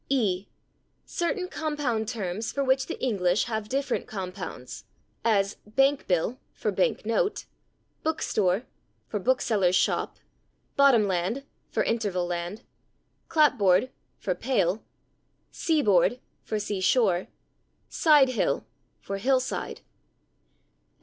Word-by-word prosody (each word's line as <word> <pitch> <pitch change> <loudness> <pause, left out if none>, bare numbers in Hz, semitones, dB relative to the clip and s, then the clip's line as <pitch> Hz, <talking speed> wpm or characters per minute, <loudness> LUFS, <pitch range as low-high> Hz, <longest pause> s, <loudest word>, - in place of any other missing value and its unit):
e. 205 -8 +1 0.6
"Certain 365 +2 -2
compound 295 - -2
terms 215 -2 -3
for 280 - -1
which 260 -1 +2
the - - -5
English 190 -6 +1
have 220 -2 -3
different 275 0 -1
compounds," 185 -9 -6 0.4
as 200 -3 +2
/bank 270 +5 +2
bill/, 185 +8 0 0.2
(/bank - - 0
note/), 475 -5 0 0.6
/book 320 0 0
store/ 190 +2 +1 0.5
(/book 245 +5 +1
seller's 190 -5 +2
shop/), - - +1 0.6
/bottom 270 -6 +6
land/ 190 +8 -1 0.4
(/interval 205 -6 0
land/), 175 +6 -4 0.7
/clapboard/ 255 - +4 0.5
(/pale/), 210 -6 +1 0.7
/sea 315 -4 +1
board/ 200 +4 +4 0.3
(/sea 205 -2 -2
shore/), 190 -4 +3 0.6
/side 295 -5 +5
hill/ 255 - 0 0.5
(/hill 260 +6 +3
side 255 - -4
220 Hz, 100 wpm, -27 LUFS, 190-270 Hz, 0.7 s, bottom